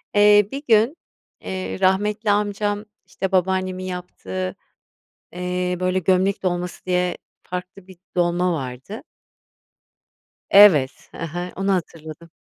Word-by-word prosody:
Eee, 205 0 +6
bir 280 +2 -5
gün, 230 +8 +4 0.4
eee, 190 0 -5
rahmetli 205 +3 +2
amcam, 205 0 -1 0.2
işte, 190 0 -4
babaannemin 185 0 0
yaptığı, 95 - -5 0.8
eee, 180 0 -2
böyle, 185 0 +1
gömlek 190 +2 +1
dolması 175 -1 -3
diye 180 -1 0 0.3
farklı 180 +1 -7
bir 190 -2 -14 0.2
dolma 175 +1 +2
vardı. 135 - -6 1.5
Evet, 170 -10 +6
hı - - -9
hı, 175 +2 -4
onu 195 +1 0
hatırladım. 165 -2 -5
185 Hz, 110 wpm, -22 LUFS, 175-200 Hz, 1.5 s, Eee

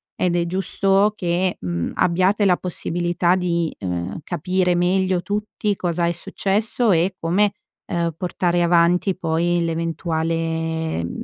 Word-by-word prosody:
ed 175 -1 0
è 170 -1 +1
giusto 195 +3 +1
che, 180 -1 0
mhmm, 85 -2 -3
abbiate 185 +4 +2
la 180 -2 +4
possibilità 175 0 0
di, 170 -3 -1
uhm, 90 -1 -3
capire 180 +3 0
meglio 185 +1 +1
tutti, 210 +1 -2
cosa 175 -2 -1
è - - +1
successo 210 +6 0
e 180 +2 +2
come, 195 +5 +2 0.4
uhm, 170 -1 0
portare 175 -1 0
avanti 175 +2 +3
poi, 170 0 0
l'eventuale, 165 - -2
mhmm, 85 - -5
175 Hz, 130 wpm, -21 LUFS, 165-185 Hz, 0.4 s, la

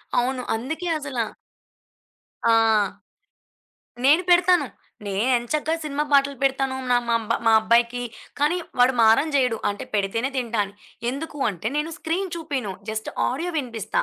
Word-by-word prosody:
అవును. 255 +1 +1
అందుకే 300 +10 -4
అసలా 265 -6 -2 1.3
ఆ! - - +5 1.5
నేను 300 +6 +6
పెడతాను. 355 -3 +5 0.4
నేనెంచక్క 245 +9 0
సినిమా 295 0 -1
పాటలు 280 0 +4
పెడతాను. 270 -1 +1
నా 245 - +5 0.5
మా 225 - +6
అబ్బాయికి, 235 +2 +2 0.4
కానీ 305 +5 +2 0.2
వాడు 255 +1 +5
మారం 225 +8 +5
జెయడు. 250 -5 +2
అంటే 205 - -6
పెడితేనే 210 +6 0
తింటా 235 -4 -1
అని. 200 0 -12 0.4
ఎందుకు 295 +3 -6
అంటే, 195 +1 -7
నేను 300 +2 -1
స్క్రీన్ 350 +3 -2
చూపీను. 280 - -3 0.2
జస్ట్ 220 0 -4 0.2
ఆడియో 330 +8 -2
వినిపిస్తా. 230 -7 -2
260 Hz, 125 wpm, -23 LUFS, 230-300 Hz, 1.5 s, నేను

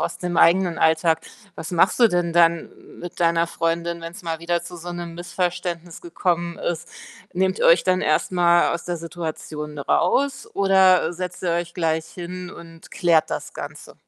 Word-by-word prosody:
aus - - -3
dem 175 -1 -3
eigenen 175 0 +4
Alltag. 160 0 +2 0.3
Was 160 - -7
machst 180 +7 +2
du 235 - +7
denn 175 -2 0
dann 170 -1 +5
m - - -17
mit 175 0 -8
deiner 170 0 +3
Freundin, 170 0 -2
wenn's 170 +4 -8
mal 165 -1 -4
wieder 170 0 0
zu 175 +1 -9
so 175 +1 -7
'nem 170 -1 -6
Missverständnis 175 -1 -4
gekommen 170 0 -2
ist? 170 0 -3 0.4
Nehmt 185 +1 0
ihr - - +4
euch 170 +1 +5
dann 185 0 +2
erst 155 +4 +1
mal 175 -1 +3
aus 170 - -5
der 175 -1 -3
Situation 155 -3 -6
raus 275 - +1
oder, 190 -3 +4
äh, - - -5
setzt 180 +1 -6
ihr 175 - +1
euch 170 0 -3
gleich 160 -2 -1
hin 180 0 -8
und 165 -2 -13
klärt 170 -3 +2
das - - -5
Ganze? - - -9
170 Hz, 185 wpm, -22 LUFS, 165-180 Hz, 0.4 s, du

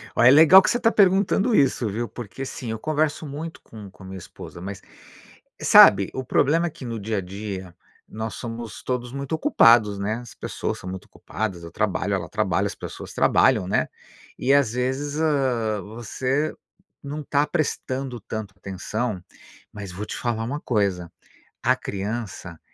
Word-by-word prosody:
Ó, - - +3
é 120 - +9
legal 160 +6 +9
que - - 0
você 240 - +1
tá 225 -1 +3
perguntando 200 +3 +3
isso, 130 -5 +2
viu. 115 +4 -3
Porque 120 +4 -7
sim, 120 -3 -6
eu 110 - -4
converso 155 +1 -1
muito 155 +4 -7
com 105 -3 -11
com 95 - -16
a - - -10
minha 95 0 -7
esposa, 85 -1 -11
mas, 100 +1 -7 0.8
sabe, - - +7
o 130 - -3
problema 165 +7 +2
é - - -2
que 130 - -10
no 115 -2 -4
dia 110 +1 -2
a - - 0
dia 95 -1 -7 0.3
nós 110 0 -5
somos 115 -1 -7
todos 125 -1 -3
muito 140 +2 -5
ocupados, 115 - +4
né, 105 +2 -1
as 120 -1 -9
pessoas - - -4
são 90 - -7
muito 95 0 -7
ocupadas, 95 -6 -5
eu 85 - -9
trabalho, - - -1
ela - - -4
trabalha, - - 0
as - - -5
pessoas - - -8
trabalham, 110 -8 +3
né, - - +1 0.5
e, 135 - +3
às 140 -6 +4
vezes, 135 +4 -2
hã, 125 -9 +1
você 130 +7 -2 0.5
não 145 +2 -5
tá 145 +1 +1
prestando 135 -6 -2
tanta 110 -2 -6
atenção, 100 +2 -4 0.5
mas 100 -3 -7
vou 100 +4 -6
te - - -6
falar 115 -2 -2
uma 145 +5 -3
coisa, 100 -7 -1 0.5
a - - +4
criança 100 -5 -5
120 Hz, 175 wpm, -24 LUFS, 100-140 Hz, 0.8 s, é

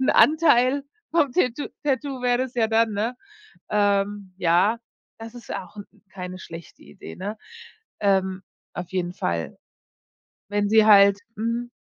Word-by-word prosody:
'n 260 - +3
Anteil 285 -4 +4 0.3
vom 300 -6 +2
Tatt 255 -3 -1
Tattoo 270 -2 -2
wäre 245 -1 +2
das 255 -1 -3
ja 225 -2 +1
dann, 225 -1 +2
ne? 225 +5 -2 0.5
Ähm, 205 -1 0
ja, 180 +6 +2 0.4
das 225 +1 -9
ist 240 - -8
auch 185 +2 -8 0.3
keine 185 -1 -8
schlechte 170 -1 -11
Idee, 195 - -11
ne? 205 +4 -5 0.6
Ähm, 190 -2 +1 0.3
auf 180 -1 -6
jeden 180 -2 -2
Fall. 85 - -3 0.9
Wenn 205 0 0
sie 220 0 +5
halt 200 -1 +7 0.2
mhm. 230 +2 -3
210 Hz, 135 wpm, -24 LUFS, 190-245 Hz, 0.9 s, halt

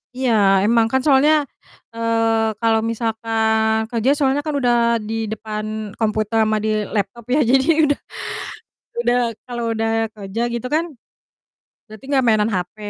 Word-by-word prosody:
Iya, 255 -2 0 0.3
emang 225 +1 +3
kan, 265 - +2
soalnya, 295 +2 +4 0.5
eee, 225 -1 0
kalau 225 -1 +3
misalkan 220 -1 0
kerja, 235 +1 0
soalnya 280 -1 +1
kan 305 -2 -2
udah 245 -3 +2 0.3
di 225 +1 -3
depan 215 0 -5
komputer 215 0 0
sama 215 0 +1
di 220 - 0 0.3
laptop 210 +3 -3
ya, - - +3
jadi 265 +3 +3 0.2
udah 290 -1 +1 1.0
udah 240 +1 +2 0.3
kalau 240 -1 -4
udah 225 0 -1 0.3
kerja, 200 +2 -5
gitu 235 +1 -3
kan, 320 +3 +1 1.0
berarti 215 +3 -13
nggak 270 -2 +2
mainan 215 -1 +3
HP. 180 +1 -3
225 Hz, 140 wpm, -20 LUFS, 220-250 Hz, 1.0 s, soalnya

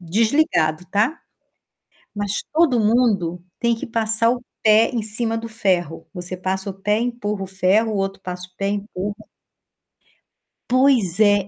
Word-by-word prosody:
desligado, 180 - +1
tá. 215 - +1 1.0
Mas 205 -1 -2
todo 310 -7 +4
mundo 210 -6 +2 0.2
tem 235 -1 +2
que 225 - -6
passar 225 0 +1
o 245 0 -3 0.2
pé 220 +1 +5
em 235 - 0
cima 225 +1 -2
do 230 0 -5
ferro. 175 -7 -1
Você 180 0 -6
passa 190 +2 -2
o - - -5
pé, 210 +3 0
empurra 235 -4 -2
o - - -6
ferro, 195 +4 +2
o - - -1
outro 195 0 -2
passa 180 -1 -6
o 180 - -36
pé, 195 - -2
empurra. 205 -1 -3 1.5
Pois 245 -8 +3
é, 205 -1 +6
é 195 - -6
210 Hz, 155 wpm, -21 LUFS, 190-230 Hz, 1.5 s, é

